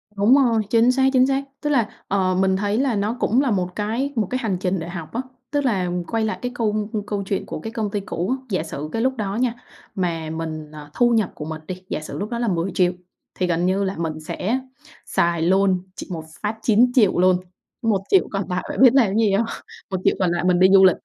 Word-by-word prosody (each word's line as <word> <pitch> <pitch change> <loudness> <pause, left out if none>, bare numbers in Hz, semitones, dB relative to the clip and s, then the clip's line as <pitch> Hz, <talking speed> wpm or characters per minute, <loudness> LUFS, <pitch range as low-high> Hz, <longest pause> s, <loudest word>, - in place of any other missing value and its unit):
Đúng 205 +6 +5
rồi, 235 -5 +3
chính 235 +2 +4
xác, 265 +1 +3
chính 255 0 +5
xác. 275 0 0 0.2
Tức 295 - -1
là, 240 -7 +2 0.2
ờ, 185 -2 +1
mình 190 0 +2
thấy 205 +2 0
là 260 -4 +1
nó 210 +4 -1
cũng 240 +6 +2
là 270 - +1
một 180 -3 -1
cái 230 +7 -2
một 215 -5 0
cái 255 - -1
hành 200 -5 0
trình 185 0 0
để 165 +1 -6
học 170 -1 -7
á, 240 - -1 0.3
tức 290 -1 0
là 190 -7 +1 0.2
quay 225 -1 0
lại 220 - -3
cái 245 - -3
câu 215 -2 -1 0.2
câu 205 -1 -2
chuyện 195 0 -2
của - - -6
cái 225 - -6
công 215 -3 -2
ty 205 - -1
cũ 185 -1 -3
á, 260 - -22
giả 185 -5 0
sử 155 -2 -6
cái 225 - -1
lúc 260 +1 0
đó 200 -1 -2
nha, 240 0 +1 0.4
mà 165 -4 -2
mình 155 -1 -5
ờ, 150 -1 -10
thu 240 -1 +3
nhập 220 -5 +2
của 150 - -6
mình 160 0 -6
đi, 185 0 -6
giả - - -2
sử 155 - -7
lúc 205 - -3
đó 235 - -3
là 240 - 0
10.000.000 180 -1 +1 0.4
thì 180 - 0
gần 175 0 +1
như 190 +2 +1
là 195 0 -2
mình 160 -2 -3
sẽ 205 +10 -2 0.5
xài 170 -1 +1
luôn 185 +1 +3
chỉ - - -7
một 160 -3 -4 0.2
phát 215 +1 -2
9.000.000 230 -3 +4
luôn, 185 0 +5 0.4
1.000.000 225 - +2
còn 195 -3 -3
lại 180 0 -1
bạn - - -2
biết 255 -1 +8
làm 270 -4 +5
cái 195 - -2
gì 220 -3 +3
hông? 225 +4 +2 0.4
1.000.000 190 -2 +1
còn 180 -2 +2
lại 175 0 -1
mình 180 -1 +3
đi 185 - +7
du 190 -1 +8
lịch. 185 - +5
200 Hz, 250 wpm, -22 LUFS, 180-230 Hz, 0.5 s, biết